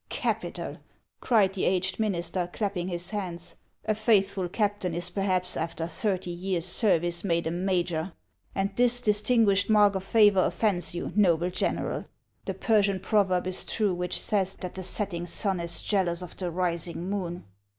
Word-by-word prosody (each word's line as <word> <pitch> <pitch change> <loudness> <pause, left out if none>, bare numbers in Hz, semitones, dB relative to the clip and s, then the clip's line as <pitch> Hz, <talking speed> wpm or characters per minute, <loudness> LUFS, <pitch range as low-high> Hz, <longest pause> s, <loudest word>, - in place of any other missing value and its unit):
" - - -44
Capital! - - -3 0.2
" - - -49
cried 210 -6 +3
the 190 - -3
aged 190 +1 +1
minister, 175 -4 -1
clapping 195 -4 -2
his 175 0 -4
hands. 180 -5 -5 0.3
''• - - +3
A - - +3
faithful 200 -4 +2
captain 205 -3 -1
is 175 +1 0
perhaps, 185 -2 0
after 165 0 -3
thirty 180 +1 -2
years' 175 -1 -2
service, 175 -3 +1
made 170 -4 0
a 160 - -1
major; 175 -1 -1 0.4
and 195 +1 0
this 245 +1 +4
distinguished 210 -2 +2
mark 210 -2 +5
of 190 -1 -3
favor 205 -2 +5
offends 190 -6 0
you, 175 - -4
noble 180 -4 +3
general? 180 - -1 0.4
The - - -3
Persian 205 -4 +2
proverb 190 -2 +1
is 185 0 +1
true 210 -4 +1
which 180 0 -1
says 195 -3 0
that 180 - -5
the 190 - -6
setting 185 -2 -1
siin 190 -1 -1
is 170 0 -3
jealous 180 -4 0
of 180 - -9
the 180 -2 -3
rising 170 0 -2
moon." 180 -3 -3
185 Hz, 170 wpm, -27 LUFS, 175-205 Hz, 0.4 s, mark